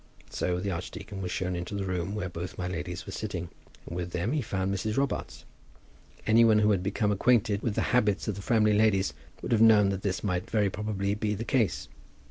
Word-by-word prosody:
So 90 0 -1
the 100 +2 -2
archdeacon 95 +3 -6
was 90 - -3
shown 90 -1 -2
into 90 +3 -4
the 100 - -2
room 95 +1 -2
where 100 -3 -2
both 85 0 -6
my 90 - -3
ladies 90 0 -5
were - - -7
sitting, 90 -6 -4 0.4
and 85 - -7
with 90 0 -4
them 90 +7 -1
he 150 0 +1
found 95 -4 -2
Mrs. 110 +4 -2
Robarts. 140 -1 -2 0.8
Any 115 +2 +5
one 110 -2 +5
who 105 0 +4
had 95 -3 +2
become 105 +2 0
acquainted 105 -1 +2
with 110 -4 -1
the - - +1
habits 105 -5 +2
of 105 - 0
the 100 - -7
Framley 105 0 +3
ladies 105 -2 +3 0.3
would - - -4
have 115 -2 +3
known 110 -3 +6
that 95 -1 -2
this 95 -2 -2
might 90 -3 -1
very 105 -3 +1
probably 100 -1 -2
be 105 0 -1
the 115 +4 -5
case. 115 -6 0
100 Hz, 220 wpm, -28 LUFS, 90-110 Hz, 0.8 s, known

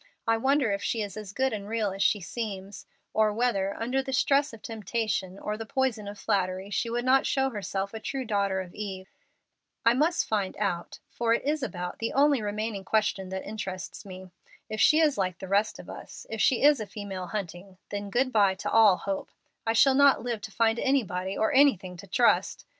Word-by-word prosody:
I 225 - +3
wonder 265 0 +2
if 200 0 -1
she 225 -2 -1
is 200 -3 -7
as 210 -3 -7
good 265 +4 0
and 205 -1 -5
real 220 -3 0
as 195 +1 -5
she 205 - +3
seems, 200 -1 -6 0.3
or 215 -1 +3
whether, 205 -4 0
under 250 +4 -1
the 265 0 -6
stress 280 +2 +3
of 225 -2 -13
temptation 215 -3 -2
or 210 +1 -4
the 225 - -6
poison 240 -5 -1
of 205 0 -7
flattery, 190 0 -1
she 230 - -1
would 240 +1 -2
not 265 +1 +4
show 270 -1 +1
herself 200 -2 -3
a 220 - -5
true 265 +3 -4
daughter 200 -3 0
of 180 -2 -10
Eve? 190 -2 -6 0.7
I 230 - +6
must 310 +7 +1
find 205 -3 -1
out, 185 -5 -2
for 230 -1 +1
it - - -3
is 300 +1 0
about 180 -8 -4
the 230 - -2
only 280 -2 +4
remaining 210 -1 -3
question 195 -2 0
that 190 0 -5
interests 190 -4 -6
me. 185 -2 -10 0.4
If 215 - -2
she 310 - +6
is 300 -7 +3
like 185 -2 -1
the 190 - -8
rest 200 +3 +1
of - - -11
us - - -10
if 225 - -2
she 255 - +3
is 290 -2 +6
a 215 - -4
female 195 -4 -6
Hunting 190 -1 -6
then 205 0 -4
good 255 +5 +1
by 200 -4 +4
to 190 - -4
all 215 -5 +6
hope. 195 -1 -4 0.4
I 225 - +3
shall 270 +4 +5
not 280 -2 +5
live 235 -3 -3
to 200 - -7
find 225 +2 +2
anybody 195 -8 0
or 220 +7 +1
anything 215 -10 +4
to 200 - -11
trust. 235 +5 +2
215 Hz, 210 wpm, -28 LUFS, 195-240 Hz, 0.7 s, I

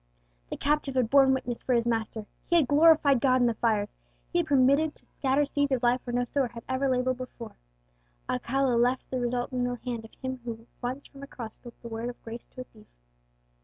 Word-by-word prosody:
The - - -4
captive 290 -2 0
had 250 -3 +1
borne 275 -1 +6
witness 250 -2 -2
for 255 - 0
his 235 -1 +2
Master, 225 -2 -2 0.2
he 345 - +2
had 320 -6 +4
glorified 295 -3 +5
God 255 -1 +4
in 245 - +4
the 235 - +2
fires, 215 -2 0 0.4
he 345 - +3
had 340 - 0
been 285 -3 +3
permitted 280 +4 +3
to - - -14
scatter 275 +2 0
seeds 285 0 0
of 255 -1 -1
life 245 +1 +3
where 240 - -5
no 245 - +2
sower 265 +2 0
had 230 -1 -10
ever 260 +1 0
laboured 255 0 +1
before. 250 -2 -8 0.7
Alcala 250 - 0
left 250 +2 +1
the 260 - -1
result 245 +1 -1
in 250 -1 0
the 245 0 -1
hand 235 -3 -3
of 225 - -14
Him 260 -1 -5
who 230 -1 -6 0.2
once 255 +3 -4
from 275 - -14
a 280 - -8
cross 230 -5 -8
spoke 240 -1 -13
the - - -6
word 230 +1 -4
of 245 - -11
grace 230 +1 -8
to 255 - -10
a - - -5
thief. 215 -4 -20
250 Hz, 235 wpm, -28 LUFS, 235-275 Hz, 0.7 s, borne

